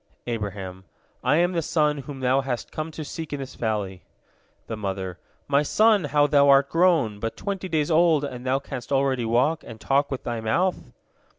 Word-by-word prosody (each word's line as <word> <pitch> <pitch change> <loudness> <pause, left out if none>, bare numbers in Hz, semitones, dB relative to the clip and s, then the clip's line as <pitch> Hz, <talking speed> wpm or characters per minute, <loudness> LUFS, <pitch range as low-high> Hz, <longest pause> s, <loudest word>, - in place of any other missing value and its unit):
Abraham: 100 -5 -5 0.4
"I 130 +4 +3
am 175 +2 +3
the 170 -2 0
son 150 -2 +1
whom 135 0 -8
thou 130 +2 +3
hast 130 -3 -4
come 155 +1 -4
to 155 -1 -7
seek 160 +1 -6
in 145 - -3
this 135 -1 -7
valley!" 105 -5 -3 0.6
The 110 - -5
mother: 95 -3 -4 0.3
"My 140 0 +3
son, 210 +4 +3
how 145 0 +3
thou 140 -1 +4
art 140 0 +5
grown! 165 - +2
But 115 +1 -4
twenty 195 -2 -4
days 155 -1 0
old, 160 -2 +4
and 125 -3 -5
thou 130 +1 +1
canst 135 -2 -7
already 135 -3 +1
walk, 125 +8 +1
and 110 -1 -10
talk 140 +4 +1
with 135 - -4
thy 120 -1 -3
mouth!" 175 +12 0
140 Hz, 190 wpm, -24 LUFS, 115-155 Hz, 0.6 s, art